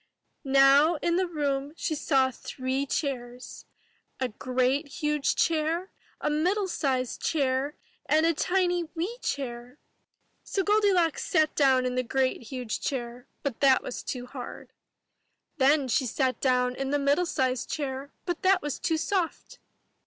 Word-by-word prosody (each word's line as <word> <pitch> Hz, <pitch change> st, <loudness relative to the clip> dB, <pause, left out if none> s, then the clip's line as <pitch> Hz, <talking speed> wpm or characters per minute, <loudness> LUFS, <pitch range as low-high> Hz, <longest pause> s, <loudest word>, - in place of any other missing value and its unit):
Now 275 Hz, +4 st, +5 dB
in 340 Hz, +2 st, 0 dB
the 370 Hz, 0 st, +1 dB
room 285 Hz, -3 st, -2 dB
she -, -, -1 dB
saw 270 Hz, -3 st, +2 dB
three 260 Hz, +2 st, -3 dB
chairs, 250 Hz, -4 st, -4 dB, 0.3 s
— -, -, -43 dB
a 255 Hz, -1 st, 0 dB
great 255 Hz, +5 st, 0 dB
huge 300 Hz, 0 st, -1 dB
chair, 330 Hz, +3 st, 0 dB, 0.3 s
a -, -, -2 dB
middle 360 Hz, +7 st, +1 dB
sized 260 Hz, -7 st, -1 dB
chair, 275 Hz, -1 st, 0 dB, 0.3 s
and 315 Hz, +1 st, +3 dB
a 335 Hz, -, +3 dB
tiny 355 Hz, +1 st, +1 dB
wee 390 Hz, +9 st, -3 dB
chair. 245 Hz, -1 st, -4 dB, 0.7 s
So 390 Hz, -, -1 dB
Goldilocks 395 Hz, -5 st, +2 dB
sat 310 Hz, -2 st, +2 dB
down 265 Hz, -3 st, +3 dB
in 250 Hz, -, -1 dB
the 255 Hz, -, +1 dB
great 255 Hz, +1 st, 0 dB
huge 245 Hz, -2 st, -5 dB
chair, 245 Hz, -1 st, -4 dB, 0.2 s
but 275 Hz, -5 st, -3 dB
that 270 Hz, -2 st, +4 dB
was -, -, -5 dB
too 250 Hz, -2 st, -5 dB
hard. 250 Hz, 0 st, -9 dB, 0.8 s
Then 280 Hz, 0 st, +4 dB
she 260 Hz, +1 st, +1 dB
sat 255 Hz, 0 st, -1 dB
down 250 Hz, -1 st, +2 dB
in 270 Hz, 0 st, -3 dB
the 290 Hz, -, +2 dB
middle 285 Hz, +5 st, +2 dB
sized 255 Hz, -5 st, -1 dB
chair, 275 Hz, -1 st, -4 dB
but 350 Hz, -2 st, -3 dB
that 375 Hz, -1 st, +3 dB
was 295 Hz, -3 st, -3 dB
too 325 Hz, -, 0 dB
soft. 370 Hz, +8 st, -2 dB
280 Hz, 150 wpm, -27 LUFS, 260-325 Hz, 0.8 s, Now